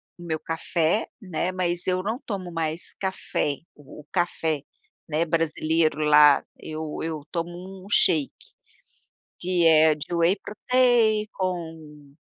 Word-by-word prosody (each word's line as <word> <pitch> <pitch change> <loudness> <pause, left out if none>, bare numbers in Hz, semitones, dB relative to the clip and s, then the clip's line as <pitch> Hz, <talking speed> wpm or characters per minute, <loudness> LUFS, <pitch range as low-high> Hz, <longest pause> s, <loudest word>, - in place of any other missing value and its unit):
o 175 - -13
meu 160 -2 -2
café, 165 +4 0
né, 185 -3 -2
mas 175 -1 -1
eu 185 0 +1
não 225 +4 -2
tomo 190 -5 -5
mais 165 0 -3
café, 190 -6 -2 0.2
o 145 0 -14
café, 165 -4 0 0.5
né, 160 +2 +1
brasileiro 160 -1 +1
lá, 150 -1 +7 0.2
eu 155 -1 -6
eu 160 -2 -3
tomo 175 +3 -6
um - - -12
shake. 160 -8 +3 1.1
Que 175 -1 +2
é 160 -1 +6
de 150 +3 -6
whey 170 +3 +3
protein 220 0 +2
com 160 -6 -5
170 Hz, 125 wpm, -25 LUFS, 155-185 Hz, 1.1 s, lá